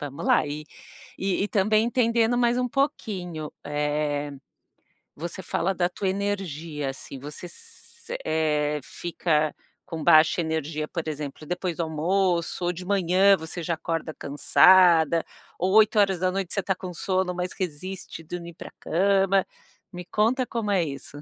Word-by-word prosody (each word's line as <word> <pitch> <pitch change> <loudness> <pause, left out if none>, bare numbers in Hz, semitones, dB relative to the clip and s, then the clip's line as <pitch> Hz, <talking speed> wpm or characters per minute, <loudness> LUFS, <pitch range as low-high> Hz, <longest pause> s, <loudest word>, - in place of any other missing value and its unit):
vamos 145 -1 -6
lá - - +4
e 150 +1 -5 0.5
e, 195 +1 0
também, 215 +2 +3
entendendo 235 -1 +2
mais 240 0 +2
um 250 0 0
pouquinho, 190 - -2
eh, 150 0 -1 0.8
você 170 +4 -6
fala 190 +2 0
da 175 0 +1
tua 195 +2 -3
energia, 170 -7 -3
assim, 135 0 -8
você 150 +6 -8
s 470 - -12
eh, 150 -1 +1
fica 155 -2 -1 0.3
com 160 -3 -6
baixa 160 0 +6
energia, 155 -1 -2
por 165 0 -4
exemplo, 150 0 -5
depois 180 0 -2
do 170 - 0
almoço, 170 +2 0
ou 175 - +2
de 180 +1 -8
manhã, 195 0 +4
você 160 +1 -6
já 170 - -1
acorda 165 -1 -3
cansada, 165 +2 +5 0.3
ou 185 +2 +1
20hrs 195 -4 +3
você - - 0
está 190 - 0
com 180 0 -7
sono, 185 +1 -1
mas 180 0 -2
resiste 185 0 -5
dormir 170 +1 -7
pra - - -10
cama, 195 +2 +2 0.5
me 180 -1 -7
conta, 230 +7 +1
como 225 -4 -2
é 185 -4 +3
isso. 140 0 -7
175 Hz, 145 wpm, -25 LUFS, 155-195 Hz, 0.8 s, baixa